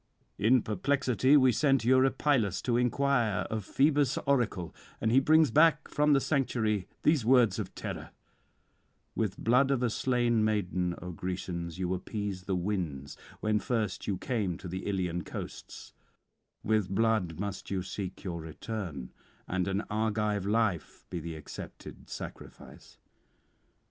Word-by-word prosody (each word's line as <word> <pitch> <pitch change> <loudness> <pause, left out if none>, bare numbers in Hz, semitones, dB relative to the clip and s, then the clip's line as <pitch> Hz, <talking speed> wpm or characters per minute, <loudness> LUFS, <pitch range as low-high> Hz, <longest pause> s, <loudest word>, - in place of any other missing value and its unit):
In 115 +4 +4
perplexity 130 +5 +2
we 130 -2 +5
send 135 +1 +2
Eurypylus 130 -4 +3
to 120 - +1
inquire 125 -3 +2
of 110 -2 -2
Phoebus' 140 +2 +2
oracle; 120 -11 0 0.3
and 110 - +1
he 130 - +6
brings 155 0 +4
back 155 +2 +4
from 150 0 +3
the 140 - +5
sanctuary 110 - 0 0.2
these 150 -5 +3
words 120 -4 +4
of - - -5
terror: - - -6 1.1
_With 110 -4 -1
blood 125 +4 +3
of 135 -3 +1
a 120 - +1
slain 120 -2 +1
maiden, 90 -4 0
O 90 - -5
Grecians, 90 -1 -4
you 90 -1 -1
appeased 95 -1 -4
the 95 - 0
winds 85 -8 -3 0.3
when 105 0 +1
first 110 -4 -2
you 100 -3 0
came 100 -9 -2
to 90 - -9
the 95 +2 -5
Ilian 90 -3 -1
coasts; - - -8 0.7
with 105 -4 +1
blood 100 -5 +1
must 100 -1 -4
you 95 -2 -1
seek 95 0 -6
your 85 -4 -4
return, 80 - -6 0.4
and 95 0 -1
an 95 +1 0
Argive 105 -2 0
life 105 -6 0
be 90 - -3
the 80 0 -6
accepted 75 - -10
sacrifice. - - -10
110 Hz, 140 wpm, -30 LUFS, 95-125 Hz, 1.1 s, he